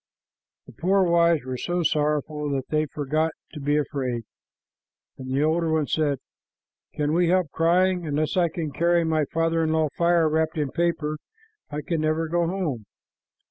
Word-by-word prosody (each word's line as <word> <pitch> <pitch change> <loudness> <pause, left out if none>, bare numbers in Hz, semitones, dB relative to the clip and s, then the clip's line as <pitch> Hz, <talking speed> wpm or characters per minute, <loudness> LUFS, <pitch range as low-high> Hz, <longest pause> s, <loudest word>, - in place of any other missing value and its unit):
The - - -13
poor 190 +3 +2
wives 170 -4 +3
were 130 -1 -4
so 175 +4 -1
sorrowful 150 -1 0
that 135 -1 -3
they 155 0 +1
forgot 155 +3 -1 0.2
to 150 - -7
be 145 +1 +1
afraid, 130 -5 -2 1.0
and 130 0 -7
the 135 +2 +1
older 160 +1 +1
one 160 -2 +2
said, 145 -2 0 0.8
"Can 150 0 0
we 175 +1 +3
help 180 -5 +2
crying? 180 +1 +2
Unless 150 +1 -1
I 175 -2 +3
can 160 -2 -4
carry 170 +4 +2
to - - -1
my 155 -2 +1
father 165 +2 0
in 160 - 0
law 160 -1 +2
fire 170 -1 +3
wrapped 160 +1 0
in 145 -3 -1
paper, 160 -3 -1 0.5
I 150 +1 -4
can 160 +1 -2
never 155 +1 0
go 170 +1 +1
home." 165 - -3
160 Hz, 175 wpm, -25 LUFS, 150-170 Hz, 1.0 s, wives